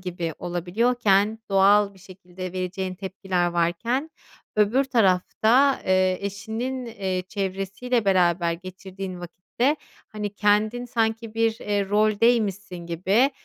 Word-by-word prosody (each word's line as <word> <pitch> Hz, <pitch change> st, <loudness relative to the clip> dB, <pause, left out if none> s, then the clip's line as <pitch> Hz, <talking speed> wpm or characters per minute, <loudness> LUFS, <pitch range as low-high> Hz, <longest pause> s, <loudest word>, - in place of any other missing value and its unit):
gibi 175 Hz, -3 st, -4 dB
olabiliyorken, 205 Hz, +4 st, +1 dB
doğal 200 Hz, +1 st, +4 dB
bir 190 Hz, -, -18 dB
şekilde 185 Hz, -1 st, -9 dB
vereceğin 185 Hz, 0 st, -3 dB
tepkiler 190 Hz, -1 st, -2 dB
varken 175 Hz, -, -1 dB, 0.5 s
öbür 220 Hz, +6 st, +3 dB
tarafta, 230 Hz, +4 st, +3 dB
eee, 185 Hz, -1 st, +2 dB
eşinin, 220 Hz, +6 st, -4 dB
eee, 190 Hz, -5 st, -3 dB
çevresiyle 195 Hz, +4 st, -2 dB
beraber 175 Hz, -3 st, +2 dB
geçirdiğin 185 Hz, +1 st, -8 dB
vakitte, 235 Hz, -, -1 dB, 0.3 s
hani, 210 Hz, -1 st, -5 dB
kendin 215 Hz, +4 st, +1 dB
sanki 225 Hz, -1 st, -1 dB
bir, 225 Hz, 0 st, +1 dB
eee, 205 Hz, -2 st, -1 dB
roldeymişsin 210 Hz, -2 st, +2 dB
gibi 190 Hz, -, +2 dB
200 Hz, 105 wpm, -24 LUFS, 185-225 Hz, 0.5 s, doğal